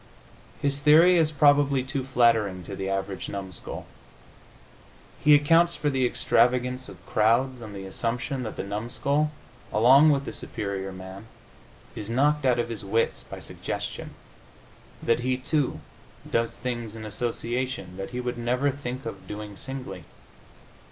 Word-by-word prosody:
His 140 0 -1
theory 160 +5 +7
is 160 -2 +3
probably 145 -2 +4
too 135 0 -3
flattering 115 -7 +2
to 100 +3 -7
the 95 0 -3
average 95 -1 -3
numskull. 95 -4 -7 1.4
He 150 0 +8
accounts 165 +4 +4
for 145 - 0
the 130 -2 +2
extravagance 125 +1 +1
of - - -13
crowds 120 +4 +2
on 110 -3 -8
the 95 -1 -7
assumption 125 +7 -2
that 110 -3 -5
the - - -4
numskull, 120 +9 -1 0.4
along 130 +8 +7
with 140 -2 +2
the - - -5
superior 100 -1 -4
man, 95 +3 -9 0.7
is 105 0 -6
knocked 145 +4 +2
out 125 -1 +4
of 120 0 -1
his 110 -3 -5
wits 110 +4 0
by - - -9
suggestion - - -6 0.9
that 115 - +2
he, 130 +1 0
too, 135 - -1 0.5
does 115 0 0
things 120 -3 -4
in 110 -1 -7
association 120 -2 -3
that 95 0 -5
he 125 - -5
would 125 -1 -3
never 125 +4 +1
think 130 -1 -6
of - - -7
doing 105 0 -7
singly. 125 -9 -7
125 Hz, 145 wpm, -26 LUFS, 105-135 Hz, 1.4 s, He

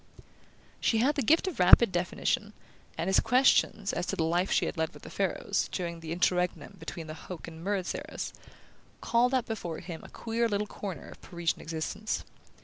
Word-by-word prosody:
She 225 - +2
had 260 +6 +3
the 285 - -1
gift 320 - +3
of 360 - -4
rapid 185 +4 +8
definition, 180 +4 -1 0.4
and - - -1
his 190 - +5
questions 225 -4 +3
as 175 - -2
to - - -1
the 165 - 0
life 175 +4 +1
she - - +3
had - - -3
led 160 -1 -2
with - - -13
the - - -9
Farlows, - - -1
during 170 -2 -3
the 165 -1 -7
interregnum 180 +3 0
between 165 -3 -6
the 155 - -6
Hoke 170 +1 -8
and 165 0 -9
Murrett 195 -1 -1
eras, - - -5 0.7
called 245 +2 +2
up 255 - +1
before 175 -7 -4
him 170 -2 -8
a - - -11
queer 230 0 -1
little 205 0 0
corner 195 -7 -6
of - - -13
Parisian 170 -1 -2
existence. 165 +7 -3
185 Hz, 190 wpm, -29 LUFS, 170-225 Hz, 0.7 s, rapid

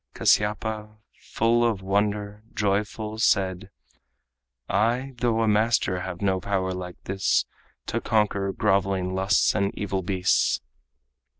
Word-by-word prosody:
Kasyapa, 105 0 +1 0.2
full 120 +1 +1
of 110 -5 0
wonder, 105 +1 -1
joyful 105 +2 -1
said: 95 -4 +1 1.0
"I, 120 +6 0
though 115 -1 +1
a - - +1
master, 105 -3 +2
have 90 +1 -6
no 95 -1 +2
power 95 -1 -1
like 90 -1 -7
this 95 0 +1 0.4
To - - -2
conquer 100 -3 +1
groveling 95 -2 0
lusts 95 +2 +2
and 100 -1 0
evil 95 -2 -2
beasts." 95 -1 +1
100 Hz, 115 wpm, -25 LUFS, 95-110 Hz, 1.0 s, master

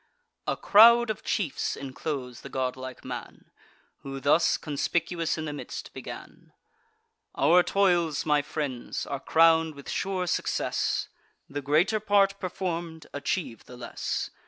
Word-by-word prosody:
A - - 0
crowd 235 +2 +7
of 215 - -6
chiefs 175 -10 -1
inclose 135 -2 -5
the - - -9
godlike 130 0 -4
man, - - -8 0.5
Who 135 0 -7
thus, 150 +4 +3
conspicuous 165 +3 -1
in 155 - -4
the 150 - -4
midst, 145 - -7
began: - - -10 0.8
"Our 180 +1 +5
toils, 175 -6 +2
my 150 -1 +3
friends, 140 -4 -4
are 140 -1 -4
crown'd 160 0 +4
with 140 - -12
sure 190 -2 -1
success; 175 - -1 0.4
The 145 +1 -5
greater 155 +10 +2
part 200 -1 +3
perform'd, 170 -4 -4
achieve 145 -3 -3
the 125 - -12
less. 120 -1 -4
160 Hz, 130 wpm, -27 LUFS, 140-180 Hz, 0.8 s, crowd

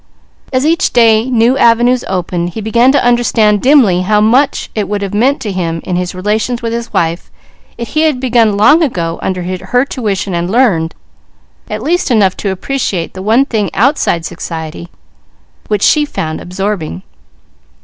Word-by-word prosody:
As 260 +1 0
each 335 +4 +1
day 230 0 +3
new 245 +2 +2
avenues 240 +2 +3
opened, 175 -2 -2
he - - -4
began 235 +4 +3
to 280 -3 +1
understand 225 -4 +2
dimly 250 -10 +4
how 210 +3 +1
much 245 +7 +1
it 210 -2 -3
would 205 -1 -2
have 195 - -5
meant 255 +7 +1
to 210 - -3
him 170 -3 -3
in 180 - -3
his 180 0 -3
relations 215 +6 -2
with 230 0 -2
his 235 0 -5
wife, 165 +1 -2 0.5
if 235 -2 -6
he 310 - 0
had 310 -5 +1
begun 230 -5 +2
long 295 +11 +5
ago 170 - -2
under 185 -1 -3
her 190 +8 -1
tuition 205 -8 -3
and 170 +1 -2
learned, 195 -9 +1 0.7
at 215 +1 -4
least 345 +4 0
enough 205 -6 +2
to 200 - -3
appreciate 190 -3 -3
the 185 - -8
one 225 +7 +2
thing 215 -8 -1
outside 215 - +1
society, 165 -1 -6 0.8
which 210 -2 -1
she 300 - +4
found 160 - -4
absorbing. 180 - -4
215 Hz, 170 wpm, -13 LUFS, 185-250 Hz, 0.8 s, long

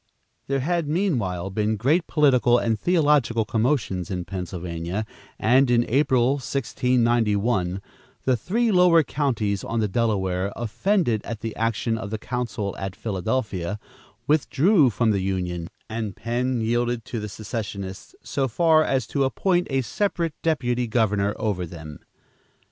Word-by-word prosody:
There 135 -1 0
had 170 +2 0
meanwhile 115 - -1
been 105 +2 0
great 150 - +2
political 130 -5 +4
and 115 -3 0
theological 145 - +2
commotions 110 - 0
in 90 -2 -3
Pennsylvania, 90 +1 -4 0.3
and 130 +4 +4
in 120 -1 +3
April, 130 0 +2
1691, 115 -7 0 0.4
the 130 - +3
three 220 - 0
lower 180 -3 +5
counties 115 -10 -1
on 115 - -2
the 110 - +1
Delaware, 95 -3 0
offended 120 - 0
at 115 -2 -6
the 115 -1 -4
action 115 0 -1
of 105 -2 -5
the 110 - -3
council 110 -4 -3
at 95 -1 -5
Philadelphia, 100 -2 -2 0.5
withdrew 155 - +3
from 115 +1 +1
the 100 -2 0
union, 90 -3 -2 0.2
and 110 -3 -4
Penn 120 +2 -1
yielded 120 +1 0
to 115 - -4
the 105 0 -5
secessionists 100 -3 -6
so 135 -1 -1
far 160 +5 +4
as 130 -6 0
to 140 +3 0
appoint 175 +6 +1
a 135 -1 +1
separate 170 - -1
deputy 125 -7 0
governor 105 -3 +1
over 100 -5 -1
them. 80 -3 -9
115 Hz, 135 wpm, -24 LUFS, 100-135 Hz, 0.5 s, lower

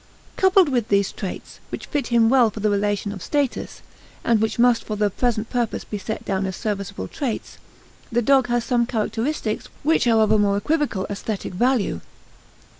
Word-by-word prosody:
Coupled 380 -2 +5
with 240 -5 0
these 200 -2 +2
traits, 195 - -7
which - - -6
fit 290 -5 -2
him 235 -2 +4
well 245 -2 +5
for 215 - -8
the 210 0 +1
relation 205 0 0
of 200 -2 -8
status 285 - -2 0.4
and 230 -2 +2
which 220 - 0
must 240 -1 +4
for 215 - -4
the 210 -1 +1
present 225 0 -1
purpose 240 -3 -1
be 210 - -5
set 220 +3 -5
down 190 0 -1
as 190 - -4
serviceable 200 - -4
traits 250 - -4 0.5
the 240 +1 +1
dog 265 +1 +4
has 240 -1 +1
some 240 -1 +1
characteristics 225 +1 -2 0.2
which 310 -3 +2
are 225 -2 +4
of 215 - +3
a 215 - +4
more 200 -1 +2
equivocal 245 -4 0
aesthetic 200 -1 -4
value. 220 - +1
225 Hz, 185 wpm, -22 LUFS, 205-245 Hz, 0.5 s, Coupled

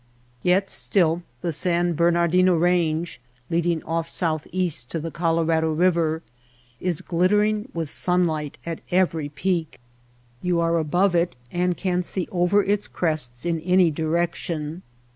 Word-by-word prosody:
Yet 185 +2 +2
still 170 -3 +1 0.2
the 170 - -1
San 175 +2 +1
Bernardino 170 +2 +3
Range, 170 -3 +1 0.3
leading 170 -1 +1
off 165 0 -2
southeast 165 -4 -1
to 165 - -2
the 165 +1 -5
Colorado 165 -1 +1
River, 165 -1 +1 0.6
is 180 -4 -1
glittering 210 +6 +1
with 165 -2 -2
sunlight 160 -3 0
at 165 -1 -5
every 165 -5 +1
peak. 165 +1 -2 0.6
You 180 -1 +1
are 170 0 +2
above 175 +5 +2
it 170 0 +1 0.2
and 180 0 0
can 180 -1 0
see 180 0 -2
over 185 +3 +3
its 205 +1 0
crests 150 -8 -2
in 170 -1 0
any 180 +1 +3
direction. 165 0 -2
170 Hz, 130 wpm, -24 LUFS, 160-180 Hz, 0.6 s, Bernardino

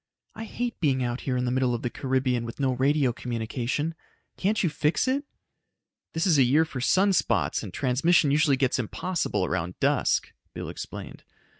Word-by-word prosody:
"I 225 - -7
hate 240 +2 -4
being 135 -6 +1
out 120 +1 -2
here 125 - +1
in 125 - 0
the 125 - 0
middle 130 -1 +1
of 120 - -6
the 120 - 0
Caribbean 130 -2 0
with 115 +3 -7
no 135 -2 +1
radio 135 0 +2
communication. 125 +6 -3 0.4
Can't 210 +3 0
you - - +3
fix 155 - 0
it?" 275 +3 0 0.9
"This 160 - 0
is 165 -7 +4
a - - +7
year 145 +6 +4
for 135 -5 -6
sun 190 +9 +3
spots, - - +1
and - - -7
transmission 145 +4 +2
usually 145 -2 +3
gets 130 -1 +1
impossible 175 - -1
around 85 +2 -3
dusk," - - +1 0.2
Bill - - -5
explained. - - -8
135 Hz, 180 wpm, -26 LUFS, 125-165 Hz, 0.9 s, a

